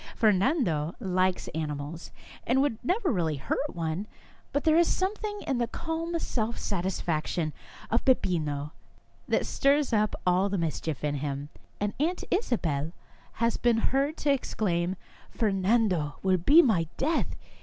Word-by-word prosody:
Fernando 200 - +2
likes 185 -1 0
animals, 150 +1 -4 0.4
and 250 +3 +3
would 270 -5 +1
never 365 - +1
really 165 -6 0
hurt 135 - -2
one, 165 +4 -2 0.4
but 285 - 0
there 315 -1 +4
is 340 - +4
something 415 +2 -1
in 270 -5 0
the 235 - +1
calm 330 +5 -3
self 235 -7 -2
satis 190 -1 -2
faction 155 -1 -1 0.4
of 230 - +2
Beppino 150 - +1 0.6
which - - +1
stirs 280 -1 +2
up 215 -1 +2
all 185 +2 +3
the 200 - -1
mis 165 -4 -1
chief 160 -3 -4
in 145 -1 0
him, 140 0 -4 0.3
and 205 0 -1
Aunt 340 +5 0
Isabel 165 - 0 0.4
has 230 0 0
been 240 -2 +3
heard 275 +6 +1
to 290 - +1
exclaim: 185 -9 0 0.2
" - - -25
Fernando 195 -6 +2
will 190 -1 +3
be 295 - +7
my 180 - +2
death 315 +5 0
200 Hz, 150 wpm, -28 LUFS, 165-270 Hz, 0.6 s, be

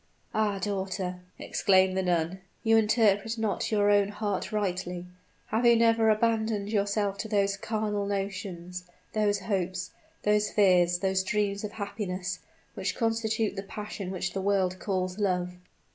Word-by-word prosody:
"Ah! 210 -2 +1
daughter," 190 -2 -3 0.2
exclaimed 190 -2 +3
the 190 - +1
nun, 175 0 0 0.2
"you 225 -1 +4
interpret 220 0 +3
not 220 -1 -1
your 205 -1 +3
own 205 -1 +4
heart 205 -1 -3
rightly. 180 -4 -2 0.4
Have 220 +3 0
you 235 -1 +7
never 225 -1 +4
abandoned 220 -2 +1
yourself 200 -1 0
to 220 - -3
those 200 -2 +1
carnal 210 -1 -2
notions 190 -3 -4 0.3
those 205 -2 +1
hopes 185 -2 -2 0.3
those 210 0 +2
fears 180 -4 +4
those 190 -1 +2
dreams 200 +1 -1
of 210 0 -5
happiness 190 -4 -4 0.3
which - - -2
constitute 225 -2 0
the 195 - -3
passion 205 -1 -6
which 180 -1 -3
the 195 - -2
world 190 -2 +1
calls 185 -1 -2
love?" 180 -3 0
200 Hz, 145 wpm, -28 LUFS, 185-215 Hz, 0.4 s, you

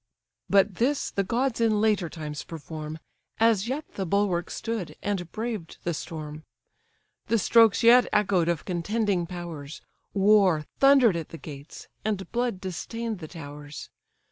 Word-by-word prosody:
But 195 -1 +3
this 270 +5 +1
the 195 - 0
gods 235 +4 0
in 220 -2 +3
later 210 -5 +2
times 150 -3 -6
perform; 155 -1 -7 0.4
As 225 -2 +3
yet 285 +5 -3
the 195 - -3
bulwark 190 -2 +1
stood, 225 -6 -4
and 190 -4 -2
braved 220 -6 -4
the 170 - -1
storm; 155 -1 -6 0.8
The 230 - +2
strokes 225 +1 +5
yet 240 +2 +7
echoed 195 -5 +2
of 170 -2 -1
contending 190 0 0
powers; 170 -4 -7 0.3
War 195 -6 +4
thunder'd 270 -7 +6
at 165 -2 -4
the 165 - -8
gates, 145 -1 -10 0.2
and 205 -3 -2
blood 240 -4 -1
distain'd 220 +4 -4
the 160 - -7
towers. 145 -2 -9
195 Hz, 145 wpm, -26 LUFS, 165-225 Hz, 0.8 s, yet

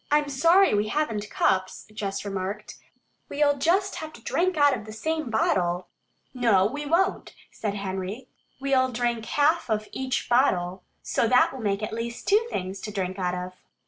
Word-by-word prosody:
"I'm 295 0 +2
sorry 335 - +4
we 210 +1 +1
haven't 215 -7 -1
cups," 185 0 0
Jess 200 -2 -4
remarked. 195 +1 -5 0.5
"We'll 285 -1 +2
just 375 +7 +1
have 315 -1 -6
to 235 - -13
drink 365 0 0
out 290 -2 +5
of 220 - -8
the 215 - -9
same 315 +5 -2
bottle." 180 -5 0 0.4
"No, 230 -7 +3
we 290 +7 -3
won't," 340 +5 0 0.2
said 205 -2 -3
Henry. 195 +5 -4 0.3
"We'll 265 -1 +2
drink 235 -1 -1
half 295 +2 +2
of 215 -1 -1
each 260 -1 -2
bottle, 185 -8 +2 0.2
so 230 - +1
that 250 +3 +4
will 265 - -7
make 200 -1 -1
at 215 - -3
least 235 +1 -5
two 425 +4 +4
things 190 - -4
to 210 - -5
drink 190 -1 -3
out 180 -1 0
of." 180 0 -5
230 Hz, 175 wpm, -26 LUFS, 195-290 Hz, 0.5 s, out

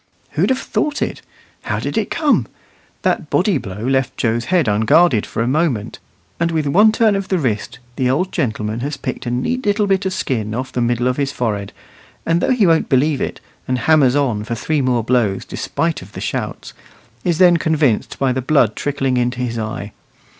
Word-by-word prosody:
Who'd - - +1
have 260 - +2
thought 295 +2 -1
it? - - -4 0.4
How - - -2
did - - -4
it - - 0
come? 305 -4 +1 0.6
That - - 0
body 195 -9 +2
blow 105 +1 -6
left 130 0 0
Joe's 120 0 0
head 175 -5 +2
unguarded 110 +5 +3
for 115 - -2
a - - -1
moment; 135 -6 0 0.4
and 170 0 +1
with 160 -2 -1
one 205 +10 +5
turn 220 -2 +3
of 195 -1 -2
the 190 - +1
wrist 120 -10 -2 0.2
the 125 -1 +1
old 180 +9 0
gentleman 110 -6 -2
has 140 +3 -3
picked 130 -2 -5
a - - 0
neat 130 - -1
little 205 +1 +2
bit 195 -1 +1
of - - -2
skin 110 - -2
off 130 +2 -4
the 125 - -2
middle 120 +1 +1
of 125 - 0
his 140 -1 0
forehead; 105 -7 -2 0.5
and 165 +1 +2
though - - +1
he 250 -6 +3
won't 165 -2 +3
believe 140 +2 +2
it, - - -4 0.3
and 130 - 0
hammers 140 -1 +4
on 125 -8 +1
for 115 +2 -3
three 150 +5 -1
more 125 -3 +1
blows 115 -5 +1
despite 165 -1 -2
of 95 +2 -13
the - - -7
shouts, - - -4 0.5
is 170 -3 +1
then 175 -1 +6
convinced 155 -8 +1
by 135 -2 +1
the 130 - -2
blood 125 -5 +2
trickling 135 -3 -1
into 125 0 0
his 120 -2 -2
eye. 110 -2 -5
135 Hz, 205 wpm, -18 LUFS, 120-165 Hz, 0.6 s, then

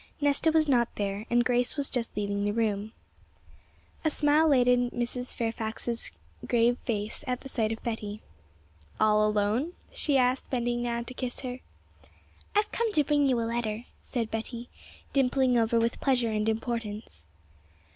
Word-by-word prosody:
Nesta 290 +2 +3
was 315 -1 +3
not 240 -4 +4
there, 205 +2 -3
and 240 0 +3
Grace 245 +3 +1
was 280 -1 0
just 235 -4 -3
leaving 200 -1 -1
the 205 0 0
room. 215 -2 0 1.1
A 315 - +3
smile 300 +1 +3
lightened 245 -2 +4
Mrs. 245 +1 -3
Fairfax's 225 0 -2 0.4
grave 240 +1 +3
face 215 0 -2
at 250 -1 -1
the 270 - -9
sight 225 -4 0
of 225 - -5
Betty. 215 -3 -4 0.8
'All 215 0 +4
alone?' 210 +10 0 0.2
she 285 -3 +2
asked, 255 0 +1
bending 240 -1 0
down 235 -1 -2
to 250 - -6
kiss 250 -1 -5
her. 255 -1 -5 1.0
'I've 420 +1 +2
come 465 -1 0
to 300 - +4
bring 290 -1 +3
you 250 -2 +2
a - - 0
letter,' 230 -1 -2 0.2
said 230 -4 -3
Betty, 235 +2 -4 0.4
dimpling 260 -1 +3
over 230 0 +3
with 230 +1 0
pleasure 245 -4 +2
and 215 0 +1
importance. 220 - -4
240 Hz, 155 wpm, -28 LUFS, 220-255 Hz, 1.1 s, not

